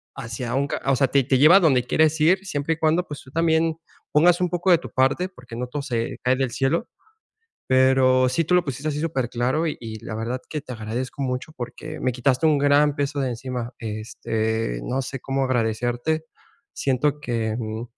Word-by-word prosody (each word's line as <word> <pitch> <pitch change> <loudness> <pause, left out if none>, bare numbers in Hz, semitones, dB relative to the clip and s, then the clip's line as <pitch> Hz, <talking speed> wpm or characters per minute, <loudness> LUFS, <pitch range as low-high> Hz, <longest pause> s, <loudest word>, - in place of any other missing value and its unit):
hacia 120 -2 -5
un 140 +1 +1
ca - - -3
o 135 -1 +3
sea, 135 +1 +3
te 140 +1 +2
te 130 0 +2
lleva 155 +7 +7
a - - +6
donde 135 -8 +3
quieres 155 +4 +2
ir 185 +5 +3
siempre 145 -2 -1
y - - -20
cuando, 165 +3 +2
pues, 145 -2 -7
tú 130 - -16
también 165 0 +1 0.3
pongas 170 +3 +5
un 180 - +1
poco 175 +1 +1
de 175 - +7
tu 165 - -9
parte, 135 +8 +2
porque 125 -8 -12
no 125 +1 -3
todo 145 +3 -4
se 120 -4 -3
cae 125 +1 +3
del 135 -3 -1
cielo. 145 - 0 0.8
Pero 130 0 +4
sí, 155 +6 0
tú 180 - +1
lo 180 - +4
pusiste 140 +2 -4
así 150 -1 -2
superclaro 130 0 -1
y 155 - -2
y 110 -2 -8
la 110 - -5
verdad 120 +3 -3
que 150 - -3
te 130 - -9
agradezco 125 +5 -4
mucho 130 +3 -3
porque 150 +5 -7
me 130 - 0
quitaste 130 +4 +1
un 150 -2 +4
gran 145 +1 +4
peso 145 0 -1
de 130 - 0
encima. 125 0 -5
Este, 110 - -3
no 130 - -2
sé 135 0 -5
cómo 135 0 -1
agradecerte. 120 +5 -1 0.5
Siento 140 +2 0
que, 115 -5 -2
mm, 110 0 -4
135 Hz, 205 wpm, -23 LUFS, 120-155 Hz, 0.8 s, lleva